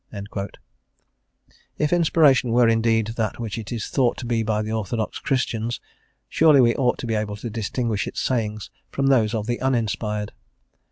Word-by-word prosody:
* - - -48
Theodore 100 -1 -6
Parker. 100 0 -4 1.3
If 150 +2 +1
inspiration 155 -7 +4
were 120 0 +5
indeed 115 -1 +2
that 110 -2 -1
which 115 -1 -4
it 110 - -8
is 115 -3 -3
thought 125 -4 +1
to 130 - -6
be 115 -1 0
by 110 -1 0
the 110 - -4
orthodox 110 0 -2
Christians, 120 -3 -1 0.5
surely 155 -3 +5
we 120 -2 +5
ought 125 -3 +1
to - - -6
be 115 - -1
able 105 -1 -2
to 110 +3 -6
distinguish 110 -2 -2
its - - -5
sayings 110 -4 -2 0.2
from 135 - -1
those 120 -5 +3
of 105 -2 -2
the 120 +1 -2
uninspired. 110 -4 -1
115 Hz, 180 wpm, -23 LUFS, 110-125 Hz, 1.3 s, were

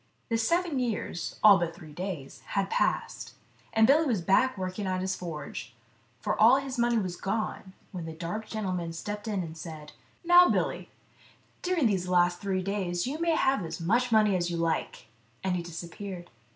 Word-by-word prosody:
The 230 - +1
seven 335 +4 +1
years, 230 -7 -3
all 205 -3 +9
but 170 -1 -2
three 155 -2 -12
days, 175 -5 -6 0.2
had 195 -1 +1
passed, - - -1 0.4
and 225 0 +5
Billy 300 +6 +5
was 215 -9 0
back 255 +7 +3
working 185 +2 -3
at 185 0 0
his 190 0 -1
forge, 150 -7 -7 0.5
for - - 0
all 235 +4 +8
his 270 -2 -3
money 235 0 +3
was 185 -5 -1
gone, 195 -1 -3 0.2
when 175 -4 -6
the 165 - -5
dark 175 +7 -5
gentleman 185 -6 -3
stepped 210 +6 -5
in 200 -4 -1
and 160 -1 -7
said: 155 -2 -9 0.2
" - - -31
Now, 350 +1 +8
Billy, - - -1 0.7
during 360 -6 +1
these 190 -5 +1
last 175 -1 +3
three 190 -2 -1
days 180 -3 -1
you 285 +5 -3
may 335 -1 +2
have 265 - +2
as 160 0 -5
much 235 +9 +1
money 215 -3 +4
as 175 -1 0
you 170 - -2
like," 165 -6 -2 0.4
and 190 -1 0
he 175 - -1
disappeared. 175 +2 -7
190 Hz, 185 wpm, -28 LUFS, 175-230 Hz, 0.7 s, all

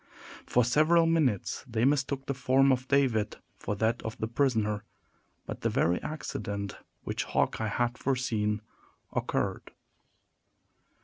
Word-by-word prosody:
For 125 -1 +3
several 155 +7 +4
minutes 155 - +1
they 115 -1 +1
mistook 135 -1 +1
the 140 - -1
form 135 +1 +3
of 130 0 0
David 125 -7 +2 0.2
for 105 - -2
that 110 +3 0
of 110 - -5
the - - -2
prisoner; 110 -4 +1 0.6
but - - -6
the - - +1
very 85 +2 +1
accident 100 -9 -4 0.3
which - - -2
Hawkeye 110 - 0
had 120 +3 -1
foreseen 110 -6 0 0.5
occurred. - - -1
120 Hz, 125 wpm, -29 LUFS, 110-135 Hz, 0.6 s, several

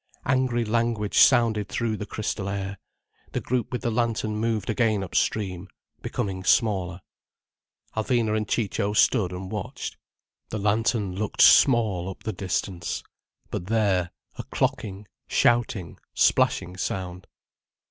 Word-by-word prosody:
Angry 130 -2 +1
language 115 -2 +1
sounded 115 -5 +4
through 115 -2 -1
the 105 0 -6
crystal 100 -2 -3
air. 100 0 -4 0.5
The - - 0
group 125 -3 -2
with 125 0 -3
the 120 - 0
lantern 110 -2 0
moved 110 -1 -1
again 110 -3 +1
upstream, 95 0 -1 0.3
becoming 95 -2 -3
smaller. 95 -4 +2 0.9
Alvina 110 -1 +1
and 110 -1 -1
Ciccio 105 -2 -1
stood 105 -3 +3
and 95 +1 -6
watched. 120 +4 -5 0.5
The 110 - -3
lantern 105 -1 +1
looked 105 +2 +1
small 110 -9 +5
up 95 - -9
the 110 - -3
distance. 90 -2 -3 0.5
But 90 - -4
there—a 100 -5 -1
clocking, 100 0 -2 0.2
shouting, 110 -8 +1 0.2
splashing 90 +2 +2
sound. 90 -1 -4
105 Hz, 120 wpm, -25 LUFS, 95-115 Hz, 0.9 s, small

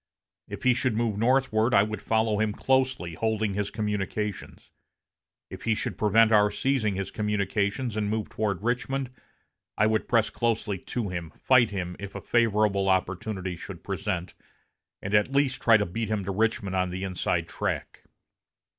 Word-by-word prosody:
If - - -8
he 125 - +5
should 120 -2 0
move 115 -3 0
northward 120 -2 +2
I 100 - +6
would 110 +1 -4
follow 110 -1 +1
him 110 -1 +1
closely, 130 -9 0
holding 110 +1 -1
his 100 0 -2
communications. 105 -1 -4 0.8
If - - -9
he 115 -1 +2
should - - -3
prevent 110 +1 +4
our 105 -1 +5
seizing 110 -1 0
his 95 0 -4
communications 105 +3 -1
and 105 -1 -1
move 110 -1 -1
toward 100 -3 -2
Richmond, 125 +2 -1 0.7
I 105 - +4
would 110 0 +1
press 115 -2 +2
closely 110 -4 -1
to 110 +2 -4
him, 85 -3 -5
fight 130 -3 +4
him, 90 -3 -4
if 100 0 -8
a - - -3
favorable 105 -4 +2
opportunity 95 0 -1
should 90 +1 -9
present, 95 -2 -3 0.7
and 95 - -4
at 105 +5 +3
least 140 -1 +1
try 115 -2 +6
to 105 - 0
beat 105 +5 -3
him 105 -3 -1
to 100 - -2
Richmond 100 -2 0
on 90 -1 +1
the 90 +2 -4
inside 95 -2 -1
track. - - -4
105 Hz, 165 wpm, -27 LUFS, 100-115 Hz, 0.8 s, I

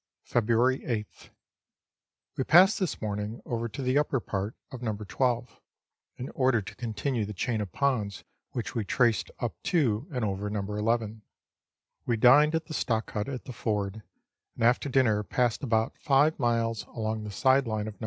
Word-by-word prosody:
February 120 +3 +2
8th. 105 -4 -5 1.1
We - - 0
passed 185 +10 +6
this 185 -5 -2
morning 105 +2 -3
over 115 -1 -2
to 130 +5 -6
the 130 +3 +3
upper 145 -3 0
part 100 0 -4 0.2
of 130 - -8
No. 110 -4 -2
12, 120 +3 -2 0.6
in 125 - -5
order 130 -3 +2
to 100 - -8
continue 120 +1 -2
the 105 0 -5
chain 110 +3 -1
of 100 -4 -5
ponds 110 -8 -1 0.3
which 110 -5 -4
we 115 - -1
traced 115 0 +1
up - - -4
to 130 -7 +1
and 125 -5 -1
over 100 0 -2
No. 105 -1 -2
11. 110 +2 -1 0.9
We 115 - +1
dined 145 +7 +6
at 160 0 -1
the 160 - -8
stock 115 -6 -1
hut 105 +4 -3
at 130 -3 -6
the 130 - -7
ford, 105 -2 -2 0.5
and - - -3
after 120 +4 +3
dinner 120 -6 +3
passed 120 +2 0
about 115 -4 0
five 150 +2 +3
miles 115 -2 0
along 110 -1 -3
the 105 - -6
side 130 +5 +3
line 110 -1 -2
of 110 - -5
No. - - -29
115 Hz, 175 wpm, -28 LUFS, 105-130 Hz, 1.1 s, passed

